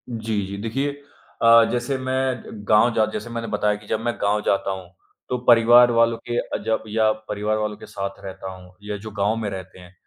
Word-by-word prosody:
जी, 110 -3 -2
जी, 100 +1 -6
देखिए 135 +7 -3 0.4
अ, 115 0 +8
जैसे 125 +2 -1
मैं 130 -1 -1
जब 105 -2 -10
गाँव 110 +3 +5
जा 110 - +3
जैसे 105 +2 -5
मैंने 115 0 -4
बताया 105 0 0
कि 105 0 -13
जब 110 - -1
मैं 120 - +1
गाँव 105 +1 +1
जाता 100 0 +1
हूँ, 95 -2 -7 0.4
तो 125 - 0
परिवार 120 +1 +7
वालों 115 0 +3
के 120 0 -1
अ, - - -3
जब 110 0 0
या 110 0 +2 0.2
परिवार 105 +1 -1
वालों 105 -1 -3
के - - -11
साथ 100 -1 -6
रहता 95 0 -7
हूँ 90 -1 -15
या 105 0 -4
जो 110 - -6
गाँव 100 +1 0
में 110 -2 -3
रहते 95 -1 -8
हैं, 90 0 -15
110 Hz, 220 wpm, -23 LUFS, 100-120 Hz, 0.4 s, अ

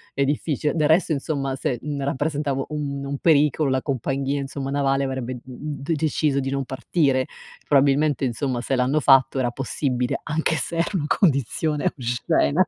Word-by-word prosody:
ehm, 140 - +2
difficile. 150 +1 -1
Del 150 -2 +2
resto 165 +1 +3
insomma 140 -2 -1
se, 130 -2 -2
mhmm, 145 0 -4
rappresentavo 140 0 -1
un 140 -2 -3
un 140 0 -3
pericolo 150 -2 +3
la 130 0 +1
compagnia 135 +1 -1
insomma 135 0 -5
navale 140 -1 +1
avrebbe, 130 -2 -3
mhmm, 145 +3 -7
de 165 - 0
deciso 150 -2 +1
di 135 0 -2
non 135 0 -2
partire. 135 0 0 0.4
Probabilmente 140 0 +3
insomma 125 0 -1
se 135 - -1
l'hanno 130 +4 +2
fatto 135 -1 +5
era 125 -2 +1
possibile, 125 -1 -2
anche 160 +1 0
se 165 +2 -3
era 165 - +1
una 145 - -2
condizione 150 - +1
oscena. 140 +7 +1
140 Hz, 165 wpm, -23 LUFS, 135-150 Hz, 0.4 s, fatto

